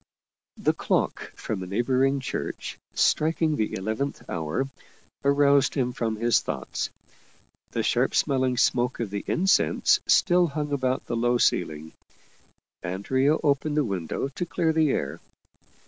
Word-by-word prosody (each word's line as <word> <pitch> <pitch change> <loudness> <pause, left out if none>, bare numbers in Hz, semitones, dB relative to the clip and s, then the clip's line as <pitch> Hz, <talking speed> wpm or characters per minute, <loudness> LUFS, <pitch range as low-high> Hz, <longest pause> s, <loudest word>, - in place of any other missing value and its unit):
The - - +1
clock - - -1
from 105 -4 -4
a 90 - -6
neighboring 130 +6 +1
church, 130 - -5 0.2
striking 160 0 +2
the 110 -6 -1
eleventh 110 +9 -3
hour, 80 - -2 0.6
aroused 140 -1 +3
him 125 -3 0
from 115 -2 -2
his 115 +2 +3
thoughts. - - -4 0.8
The - - -2
sharp - - +1
smelling 130 -2 +1
smoke 125 0 +1
of 115 -4 -3
the 100 0 -3
incense 190 +2 +3
still 175 -1 +4
hung 150 -1 -4
about 130 -2 -1
the - - -3
low 120 +1 +2
ceiling; 80 -8 0 0.9
Andrea 130 - +1
opened 145 +1 +1
the 150 - +4
window 95 - -3
to 140 - -4
clear 165 -1 0
the 155 -2 +3
air. 75 - -2
130 Hz, 135 wpm, -26 LUFS, 110-145 Hz, 0.9 s, still